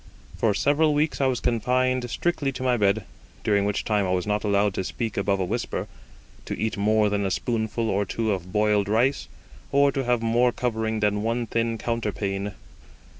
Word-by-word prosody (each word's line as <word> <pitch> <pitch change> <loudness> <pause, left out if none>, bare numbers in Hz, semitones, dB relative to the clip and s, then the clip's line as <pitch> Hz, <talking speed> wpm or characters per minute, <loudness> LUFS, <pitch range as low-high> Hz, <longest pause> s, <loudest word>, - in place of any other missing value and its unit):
For 105 -3 +1
several 150 +4 +2
weeks 150 0 0
I 135 - +4
was 130 -3 0
confined 125 +2 +1
strictly 155 -4 -1
to 130 - -5
my 125 -1 +3
bed, 105 -1 +2 0.4
during 100 -2 +2
which 105 0 -1
time 105 -3 +1
I - - -2
was 90 -1 0
not 105 0 -1
allowed 100 -1 +2
to 95 - -2
speak 115 +3 -4
above 100 0 0
a 95 - 0
whisper, 115 +6 -3 0.6
to - - -4
eat 110 +1 -1
more 105 +1 +3
than 100 0 0
a 95 - 0
spoonful 110 +2 -1
or 100 -1 +1
two 110 +2 -1
of 90 -2 -4
boiled 105 -1 +2
rice, 120 +6 +1 0.4
or 140 0 +4
to 135 0 -2
have 120 -1 +1
more 120 +2 +3
covering 110 -2 -2
than 105 0 +1
one 115 +2 -1
thin 115 0 -1
counterpane. 105 -4 -2
110 Hz, 190 wpm, -25 LUFS, 105-125 Hz, 0.6 s, I